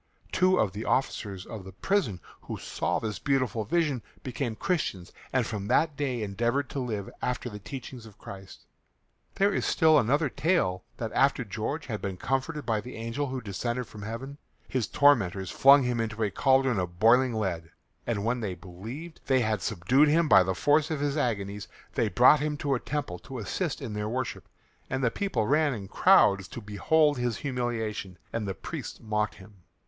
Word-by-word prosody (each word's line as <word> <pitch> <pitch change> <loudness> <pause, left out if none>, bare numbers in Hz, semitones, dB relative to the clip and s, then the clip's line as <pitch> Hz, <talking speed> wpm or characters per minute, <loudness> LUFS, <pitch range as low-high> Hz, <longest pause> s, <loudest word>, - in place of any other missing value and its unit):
Two 185 0 +3
of 100 - +2
the 105 +4 -5
officers 100 -8 -1
of 110 -4 -8
the 95 0 -11
prison 120 - 0 0.2
who - - -6
saw - - -2
this 105 -3 -4
beautiful 130 -4 0
vision 150 -1 +1 0.2
became 125 -3 -3
Christians 110 - -2 0.2
and 130 -3 +2
from 105 -3 -4
that 155 +6 +2
day 130 -5 -2
endeavoured 120 +7 -1
to 140 - -3
live 110 -6 -3
after 125 -1 -2
the 105 - -7
teachings 125 0 -8
of 105 - -16
Christ. 95 -1 -11 0.7
There 200 +1 +3
is - - 0
still 160 -3 +5
another 145 +6 +2
tale 130 - 0
that 115 -2 -4
after 135 -1 +3
George 115 +8 -4
had 110 -6 -4
been 95 -2 -4
comforted 135 - -2
by 110 -2 0
the 125 - -9
angel 115 +6 -3
who 130 -1 -4
descended 120 +4 -3
from 105 -1 -11
heaven, 125 +7 -6 0.3
his 130 -4 -1
tormentors 100 -10 +3
flung 140 +1 +7
him 125 -1 0
into 110 0 -2
a 105 - 0
cauldron 135 -4 +3
of 90 -1 -4
boiling 120 +2 +5
lead, 85 -6 -2 0.4
and 105 -3 -1
when 120 +2 +1
they 100 -5 -3
believed 110 - -9
they 130 -2 +4
had 110 -3 0
subdued 125 - +3
him 160 +2 +3
by 95 -9 +7
the 95 0 0
force 145 - +3
of 155 -3 -2
his 145 0 0
agonies, 105 -7 -2 0.3
they - - +1
brought 150 - +6
him 150 +1 -1
to 140 -1 0
a 125 - +1
temple 135 -14 -4
to 130 - -9
assist 140 - -3
in 115 -5 -5
their 105 0 -2
worship, 130 +3 -4 0.4
and 130 0 -2
the 115 - +3
people 130 - -1
ran 145 +1 +2
in 100 -3 -7
crowds 100 0 +4
to - - -8
behold 145 +8 +2
his 120 -3 -1
humiliation, 115 -7 -3 0.2
and 110 -3 -2
the 95 - -3
priests - - -7
mocked 105 -1 -1
him. 100 +1 -15
120 Hz, 190 wpm, -28 LUFS, 105-140 Hz, 0.7 s, flung